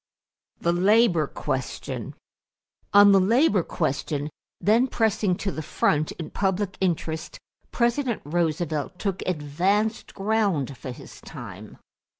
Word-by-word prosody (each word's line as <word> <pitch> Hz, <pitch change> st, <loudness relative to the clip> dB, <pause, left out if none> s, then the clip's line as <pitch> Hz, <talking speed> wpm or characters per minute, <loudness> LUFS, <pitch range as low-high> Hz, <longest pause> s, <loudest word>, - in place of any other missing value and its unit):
=The 170 Hz, -, +1 dB
Labor 185 Hz, -3 st, +4 dB
Question.= 135 Hz, -3 st, -4 dB, 0.8 s
On 205 Hz, 0 st, +8 dB
the 195 Hz, -, +6 dB
labor 210 Hz, -, +3 dB
question, 150 Hz, -2 st, -2 dB, 0.3 s
then 230 Hz, +5 st, +3 dB
pressing 220 Hz, -6 st, +1 dB
to 195 Hz, +2 st, -3 dB
the 155 Hz, -, -5 dB
front 150 Hz, 0 st, 0 dB
in 160 Hz, -3 st, -8 dB
public 195 Hz, 0 st, -1 dB
interest, 165 Hz, -3 st, -2 dB, 0.3 s
President 240 Hz, 0 st, 0 dB
Roosevelt 160 Hz, 0 st, -1 dB
took 195 Hz, -2 st, -2 dB
advanced 185 Hz, +7 st, 0 dB
ground 195 Hz, -, 0 dB
for 130 Hz, -, -8 dB
his 125 Hz, -, -10 dB
time. -, -, -10 dB
185 Hz, 115 wpm, -25 LUFS, 155-210 Hz, 0.8 s, On